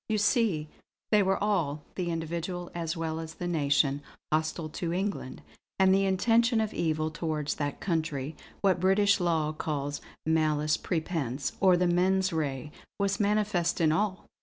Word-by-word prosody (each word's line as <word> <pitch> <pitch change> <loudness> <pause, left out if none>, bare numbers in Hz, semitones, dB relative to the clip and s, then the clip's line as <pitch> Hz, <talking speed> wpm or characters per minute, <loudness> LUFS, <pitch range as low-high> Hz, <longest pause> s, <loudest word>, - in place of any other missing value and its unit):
You 215 - +2
see, 205 - +2 0.4
they 210 -1 +6
were 190 -1 +2
all 160 -8 0
the 180 -2 -2
individual 170 +2 -3
as 165 -1 -3
well 160 -1 -2
as 160 0 -7
the 175 - -5
nation 145 -4 +2 0.3
hostile 155 +1 0
to 165 +2 -3
England; 185 -7 -3 0.3
and 190 0 +5
the 195 0 +3
intention 230 +5 +3
of 220 -1 -1
evil 155 -1 0
towards 155 -2 -2
that 145 -1 -3
country, 160 -5 -2 0.3
what 190 -3 +3
British 200 +2 +4
law 165 -3 +1
calls 145 -2 -3 0.2
'malice 155 -1 +2
prepense' 155 -7 -2
or 185 -2 +5
the 180 - +2
'mens 185 +2 +2
rea' 145 -3 -2 0.3
was 200 0 0
manifest 205 -4 +1
in 160 -2 +4
all!" 190 +2 0
170 Hz, 155 wpm, -29 LUFS, 155-190 Hz, 0.4 s, they